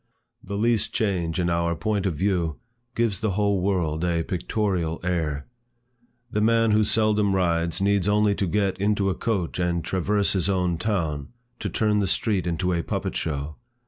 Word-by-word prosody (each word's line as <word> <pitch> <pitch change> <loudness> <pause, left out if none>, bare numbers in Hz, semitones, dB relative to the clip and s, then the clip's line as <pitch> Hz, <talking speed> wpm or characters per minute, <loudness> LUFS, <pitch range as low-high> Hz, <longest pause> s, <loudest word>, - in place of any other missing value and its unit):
The 100 +1 -4
least 115 0 +1
change 90 -6 0
in 90 - +1
our 85 0 +1
point 100 +4 -1
of 90 - -1
view, 85 -3 0 0.4
gives 115 -5 0
the 110 -3 -1
whole 100 -2 +2
world 85 -5 0
a 85 -2 +1
pictorial 90 -2 -1
air. 80 -6 -1 0.9
A 105 - +1
man 115 0 +3
who 110 +1 +4
seldom 105 -2 +2
rides, 85 -2 +1
needs 100 -1 +2
only 105 0 +3
to 100 -1 -1
get 100 +1 0
into 100 -1 +1
a - - 0
coach 95 -7 -2
and 85 -2 0
traverse 100 +3 +1
his 95 -1 +1
own 90 -3 0
town, 85 -8 -1 0.3
to - - -3
turn 105 -1 +1
the 100 - +1
street 95 -5 0
into 90 +2 0
a 85 - 0
puppet - - -3
show. 75 -1 -3
95 Hz, 175 wpm, -25 LUFS, 85-105 Hz, 0.9 s, who